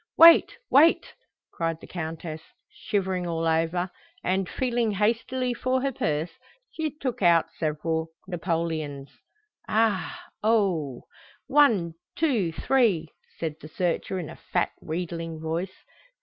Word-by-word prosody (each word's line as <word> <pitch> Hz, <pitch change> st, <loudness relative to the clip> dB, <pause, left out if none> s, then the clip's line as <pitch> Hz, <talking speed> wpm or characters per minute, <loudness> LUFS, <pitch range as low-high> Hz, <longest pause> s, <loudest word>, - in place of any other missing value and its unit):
"Wait, 335 Hz, +8 st, +8 dB
wait!" 315 Hz, +5 st, +5 dB, 0.4 s
cried 165 Hz, -1 st, -2 dB
the -, -, -11 dB
Countess, 160 Hz, -2 st, -5 dB, 0.3 s
shivering 190 Hz, -4 st, -2 dB
all 165 Hz, -1 st, -1 dB
over, 165 Hz, +3 st, +1 dB, 0.3 s
and, 185 Hz, 0 st, 0 dB
feeling 240 Hz, -4 st, 0 dB
hastily 235 Hz, +5 st, 0 dB
for 255 Hz, +2 st, 0 dB
her 275 Hz, +1 st, 0 dB
purse, 155 Hz, -, -1 dB, 0.4 s
she 315 Hz, -1 st, -2 dB
took 270 Hz, -6 st, -4 dB
out 170 Hz, -3 st, +4 dB
several 160 Hz, +1 st, -1 dB, 0.2 s
napoleons. 160 Hz, -5 st, -2 dB, 0.6 s
"Aha! 225 Hz, -, +1 dB, 0.2 s
oho! 190 Hz, -, +1 dB, 0.4 s
One, 230 Hz, -, +4 dB, 0.2 s
two, 240 Hz, -, +1 dB
three," 195 Hz, -6 st, +2 dB, 0.3 s
said 160 Hz, -2 st, -3 dB
the -, -, -9 dB
searcher 175 Hz, +3 st, -1 dB
in 175 Hz, -4 st, -4 dB
a 165 Hz, -, -9 dB, 0.2 s
fat, -, -, +2 dB
wheedling 165 Hz, 0 st, -4 dB
voice. 165 Hz, +4 st, -4 dB
180 Hz, 120 wpm, -26 LUFS, 165-230 Hz, 0.6 s, Wait